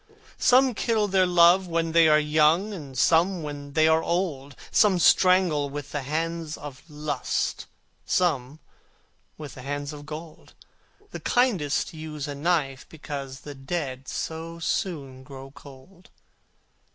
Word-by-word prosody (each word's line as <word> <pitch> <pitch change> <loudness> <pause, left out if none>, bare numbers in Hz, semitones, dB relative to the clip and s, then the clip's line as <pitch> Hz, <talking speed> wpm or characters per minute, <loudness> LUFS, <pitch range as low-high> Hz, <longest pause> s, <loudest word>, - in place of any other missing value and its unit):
Some 255 0 +4
kill 220 -1 0
their 190 -1 +3
love 175 +1 +5
when 165 -1 -1
they 165 0 +5
are 150 -1 +6
young, 155 +7 +2
And 140 -8 -9
some 170 +6 +3
when 145 -1 -7
they 155 +1 +4
are 160 0 +4
old; 155 -7 -2 0.2
Some 205 -4 +4
strangle 175 -5 +4
with 145 0 -7
the 145 - -3
hands 160 +2 -3
of 145 -3 -9
Lust, 150 -3 -3 0.4
Some 150 -5 0 0.8
with 150 -4 -8
the 125 - -10
hands 145 +2 -4
of 145 -1 -11
Gold: 155 +1 -10 0.6
The - - -6
kindest 195 - 0
use 155 -2 -6
a 145 - -4
knife, 140 -3 -1
because 140 -4 -7
The 145 - -8
dead 135 -2 -5
so 165 +1 -5
soon 145 -6 -3
grow 135 0 -11
cold. 140 +6 -16
155 Hz, 140 wpm, -25 LUFS, 140-175 Hz, 0.8 s, are